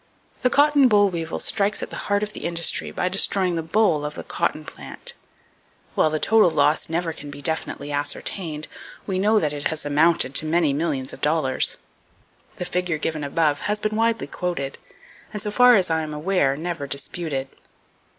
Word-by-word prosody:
The 250 Hz, -, +3 dB
cotton 285 Hz, 0 st, +5 dB
boll 205 Hz, -3 st, +4 dB
weevil 165 Hz, -2 st, -4 dB
strikes 205 Hz, -1 st, 0 dB
at -, -, -7 dB
the -, -, -6 dB
heart 205 Hz, 0 st, +2 dB
of 210 Hz, 0 st, -4 dB
the -, -, -6 dB
industry 170 Hz, -1 st, +2 dB
by 180 Hz, -, -2 dB
destroying 185 Hz, -1 st, +1 dB
the 165 Hz, -, -1 dB
boll 165 Hz, -2 st, +1 dB
of 150 Hz, 0 st, -4 dB
the -, -, -6 dB
cotton -, -, -2 dB
plant. -, -, -7 dB, 0.8 s
While 155 Hz, -, +3 dB
the 155 Hz, -, -1 dB
total 220 Hz, -1 st, +5 dB
[Page -, -, -9 dB
216] 145 Hz, +2 st, +2 dB
loss 165 Hz, -, +1 dB
never 170 Hz, -2 st, -2 dB
can 145 Hz, -, -9 dB
be 145 Hz, 0 st, -9 dB
definitely 145 Hz, -1 st, -2 dB
ascertained, 150 Hz, +2 st, -3 dB, 0.4 s
we 190 Hz, -2 st, -2 dB
know 215 Hz, +3 st, +3 dB
that 150 Hz, -4 st, -1 dB
it 145 Hz, 0 st, -4 dB
has 160 Hz, -1 st, -1 dB
amounted 145 Hz, -1 st, +3 dB
to 155 Hz, -, +2 dB
many 160 Hz, -3 st, +2 dB
millions 145 Hz, -3 st, -2 dB
of -, -, -11 dB
dollars. 150 Hz, -3 st, +2 dB, 0.8 s
The 180 Hz, -, -5 dB
figure 180 Hz, -2 st, -1 dB
given 155 Hz, 0 st, -3 dB
above 145 Hz, +1 st, +1 dB
has 210 Hz, 0 st, 0 dB
been 215 Hz, 0 st, -2 dB
widely 225 Hz, 0 st, +1 dB
quoted, 170 Hz, -7 st, -4 dB, 0.5 s
and 210 Hz, -, -4 dB
so 210 Hz, 0 st, -1 dB
far 250 Hz, +2 st, +6 dB
as 185 Hz, -5 st, +2 dB
I 160 Hz, 0 st, +1 dB
am 155 Hz, -1 st, -5 dB
aware, 150 Hz, -4 st, +1 dB
never 165 Hz, -3 st, -4 dB
disputed. 140 Hz, -1 st, -3 dB
165 Hz, 190 wpm, -23 LUFS, 150-200 Hz, 0.8 s, far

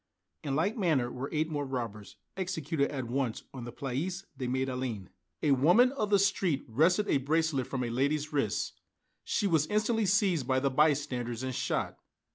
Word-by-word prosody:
In 140 Hz, -3 st, -1 dB
like 185 Hz, +8 st, +1 dB
manner 155 Hz, -, +1 dB
were 130 Hz, +2 st, -5 dB
eight 155 Hz, 0 st, 0 dB
more 150 Hz, -3 st, -2 dB
robbers 115 Hz, -6 st, -5 dB, 0.2 s
executed 160 Hz, -6 st, -1 dB
at 135 Hz, -4 st, -4 dB
once 125 Hz, -1 st, -2 dB
on 125 Hz, -3 st, -7 dB
the 120 Hz, -, -6 dB
Place 155 Hz, +10 st, -3 dB
de 130 Hz, -, -4 dB
la -, -, -2 dB
Madeleine. 130 Hz, -6 st, -3 dB, 0.3 s
A 150 Hz, -, +3 dB
woman 175 Hz, -, +5 dB
of 240 Hz, -7 st, -2 dB
the 205 Hz, -, +5 dB
street 190 Hz, -6 st, +1 dB
wrested 170 Hz, -, +3 dB
a -, -, +3 dB
bracelet 150 Hz, -1 st, 0 dB
from 130 Hz, -2 st, -2 dB
a 120 Hz, -, -2 dB
lady's 145 Hz, +5 st, 0 dB
wrist; 135 Hz, -9 st, -1 dB, 0.4 s
she -, -, 0 dB
was 160 Hz, -5 st, +2 dB
instantly 215 Hz, +1 st, +1 dB
seized 190 Hz, -, +2 dB
by 130 Hz, 0 st, +2 dB
the 135 Hz, 0 st, 0 dB
bystanders 130 Hz, -5 st, +1 dB
and 130 Hz, 0 st, -2 dB
shot. -, -, -2 dB
145 Hz, 180 wpm, -30 LUFS, 130-175 Hz, 0.4 s, woman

